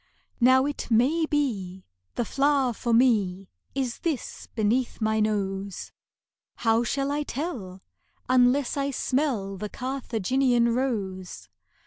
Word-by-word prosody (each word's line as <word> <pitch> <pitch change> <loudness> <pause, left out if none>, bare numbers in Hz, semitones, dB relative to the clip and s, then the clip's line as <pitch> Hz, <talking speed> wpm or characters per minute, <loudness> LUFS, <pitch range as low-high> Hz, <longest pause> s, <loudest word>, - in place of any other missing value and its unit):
Now 260 +2 +5
it 290 0 -3
may 275 +8 +3
be, 200 -12 -2 0.3
the 240 - -1
flower 275 -1 +2
for 235 +2 -3
me 205 -6 +2 0.3
Is 260 -3 -2
this 315 -7 -4
beneath 235 +3 0
my 220 0 +1
nose; 200 -2 -2 0.6
How 225 0 +2
shall 275 +3 -1
I 295 +1 0
tell, 245 - -5 0.4
unless 255 +2 +3
I 280 0 0
smell 255 -8 -1
The 210 +2 -5
Carthaginian 250 -1 0
rose? 200 -8 -3
240 Hz, 115 wpm, -26 LUFS, 210-270 Hz, 0.6 s, Now